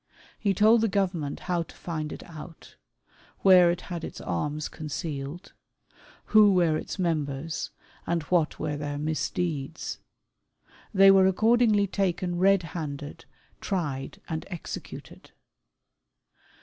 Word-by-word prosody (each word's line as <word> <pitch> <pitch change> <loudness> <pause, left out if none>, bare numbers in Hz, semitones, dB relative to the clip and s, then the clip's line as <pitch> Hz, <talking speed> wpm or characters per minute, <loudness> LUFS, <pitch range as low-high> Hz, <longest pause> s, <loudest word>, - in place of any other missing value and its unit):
He 200 -2 +1
told 220 +4 +5
the 225 - +3
Government 180 -7 -1
how 175 -1 -1
to 165 - -9
find 155 -3 -4
it - - -8
out; 165 0 -12 0.7
where 185 -2 +7
it 175 +1 -1
had 170 -2 -6
its - - -7
arms 150 - -2
concealed; 155 +2 -6 0.7
who 210 -2 +6
were 170 -3 +3
its - - -4
members; 155 -4 -2 0.4
and 170 -2 0
what 165 -2 +1
were 150 -2 -3
their 145 0 -4
misdeeds. 155 0 -3 0.9
They 195 -1 +7
were 190 -1 +6
accordingly 220 +1 +3
taken 180 -2 -1
red 195 0 +4
handed, 145 -3 -6 0.3
tried, 145 -9 -3
and 160 -1 -3
executed. 175 -5 -8
170 Hz, 120 wpm, -27 LUFS, 150-190 Hz, 0.9 s, where